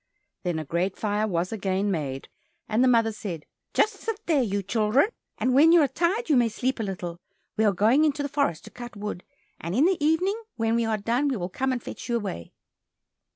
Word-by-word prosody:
Then 175 Hz, -3 st, -2 dB
a 155 Hz, -, -4 dB
great 175 Hz, +6 st, -1 dB
fire 210 Hz, 0 st, 0 dB
was 175 Hz, -2 st, -1 dB
again 200 Hz, -1 st, -1 dB
made, 140 Hz, -6 st, -3 dB, 0.4 s
and 220 Hz, +3 st, +2 dB
the -, -, +5 dB
mother 230 Hz, -2 st, +4 dB
said, 195 Hz, -9 st, -6 dB, 0.3 s
"Just 435 Hz, -, +2 dB
sit 450 Hz, -2 st, -4 dB
there, 310 Hz, -5 st, +3 dB
you 200 Hz, -4 st, -1 dB
children, 220 Hz, -, +2 dB, 0.3 s
and 255 Hz, -, +1 dB
when 300 Hz, +5 st, +7 dB
you 345 Hz, -, +7 dB
are -, -, +3 dB
tired 355 Hz, -, 0 dB
you 305 Hz, -, +3 dB
may 240 Hz, -2 st, +4 dB
sleep 250 Hz, +3 st, -2 dB
a -, -, -1 dB
little; 180 Hz, -4 st, -5 dB, 0.4 s
we 220 Hz, -, +2 dB
are 205 Hz, -, +5 dB
going 220 Hz, -, +3 dB
into 295 Hz, -1 st, +1 dB
the -, -, -1 dB
forest 280 Hz, -, -1 dB
to -, -, -12 dB
cut 240 Hz, -1 st, -9 dB
wood, 205 Hz, -3 st, -5 dB, 0.4 s
and 170 Hz, +3 st, -4 dB
in 275 Hz, +6 st, +4 dB
the 360 Hz, -4 st, +1 dB
evening 365 Hz, +8 st, +2 dB
when 225 Hz, -1 st, 0 dB
we 235 Hz, 0 st, +2 dB
are 220 Hz, -1 st, 0 dB
done, 235 Hz, +7 st, 0 dB
we 265 Hz, -4 st, 0 dB
will 175 Hz, -1 st, -3 dB
come 265 Hz, +8 st, -1 dB
and 245 Hz, -2 st, -3 dB
fetch -, -, -8 dB
you 235 Hz, -, +1 dB
away." 195 Hz, -, -4 dB
225 Hz, 225 wpm, -26 LUFS, 195-275 Hz, 0.4 s, when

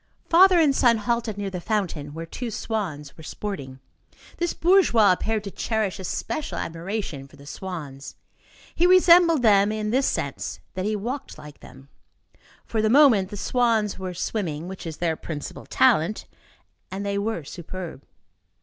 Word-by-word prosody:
Father 365 Hz, +1 st, +6 dB
and 295 Hz, -4 st, +4 dB
son 235 Hz, -3 st, +4 dB
halted 230 Hz, -1 st, -2 dB
near 200 Hz, -1 st, -3 dB
the 180 Hz, -2 st, -5 dB
fountain 170 Hz, -8 st, -2 dB
where 165 Hz, 0 st, -5 dB
two 240 Hz, +8 st, -6 dB
swans 180 Hz, -11 st, -4 dB
were -, -, -13 dB
sporting. 145 Hz, -7 st, -6 dB, 0.6 s
This 345 Hz, 0 st, 0 dB
bourgeois 330 Hz, -, +4 dB
appeared 215 Hz, +3 st, -1 dB
to 200 Hz, -, -6 dB
cherish 215 Hz, -3 st, -2 dB
a -, -, -6 dB
special 290 Hz, -, -4 dB
admiration 165 Hz, -4 st, -4 dB
for -, -, -18 dB
the 140 Hz, -, -15 dB
swans. 145 Hz, -5 st, -7 dB, 0.6 s
He 350 Hz, -, +3 dB
resembled 345 Hz, -5 st, +6 dB
them 205 Hz, -2 st, +5 dB
in 215 Hz, -1 st, -2 dB
this 265 Hz, +3 st, +2 dB
sense, -, -, -3 dB
that 185 Hz, 0 st, -3 dB
he 215 Hz, +1 st, 0 dB
walked 245 Hz, +7 st, -5 dB
like 150 Hz, -1 st, -12 dB
them. 135 Hz, +2 st, -15 dB, 0.8 s
For 220 Hz, -, -1 dB
the 215 Hz, -, +2 dB
moment, 235 Hz, -8 st, +5 dB
the 205 Hz, -, -7 dB
swans 225 Hz, -3 st, +1 dB
were 185 Hz, -1 st, -5 dB
swimming, 170 Hz, -5 st, -3 dB
which 190 Hz, -2 st, -7 dB
is 160 Hz, -2 st, -6 dB
their 165 Hz, -2 st, 0 dB
principal 150 Hz, -2 st, -7 dB
talent, 215 Hz, -6 st, +2 dB, 0.6 s
and 195 Hz, +2 st, -5 dB
they 200 Hz, 0 st, -1 dB
were 205 Hz, -5 st, -2 dB
superb. 175 Hz, -1 st, -8 dB
205 Hz, 160 wpm, -24 LUFS, 165-235 Hz, 0.8 s, Father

